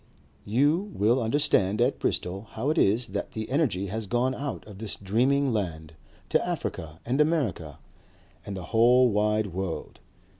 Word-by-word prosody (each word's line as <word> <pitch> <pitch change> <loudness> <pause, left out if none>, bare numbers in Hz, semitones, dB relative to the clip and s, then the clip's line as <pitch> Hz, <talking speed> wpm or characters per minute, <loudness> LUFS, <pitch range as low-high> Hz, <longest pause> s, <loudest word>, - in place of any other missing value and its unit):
You 145 - +2
will 115 +5 +3
understand 110 -5 +2
at - - +2
Bristol 95 +4 -2
how 130 +7 0
it 160 - +1
is 110 +4 +2
that 100 +1 -4
the 110 -1 -4
energy 130 - +1
has 105 +2 -4
gone 125 +4 +1
out 140 +1 -5
of 105 -2 -12
this 110 -2 -4
dreaming 130 +7 +1
land 80 -7 -3 0.4
to - - +2
Africa 80 0 -4
and 130 +5 +1
America 130 - 0 0.7
and 100 -1 -6
the 90 - -6
whole 120 +2 +5
wide 105 -2 +1
world. 95 -2 -4
110 Hz, 155 wpm, -27 LUFS, 95-130 Hz, 0.7 s, whole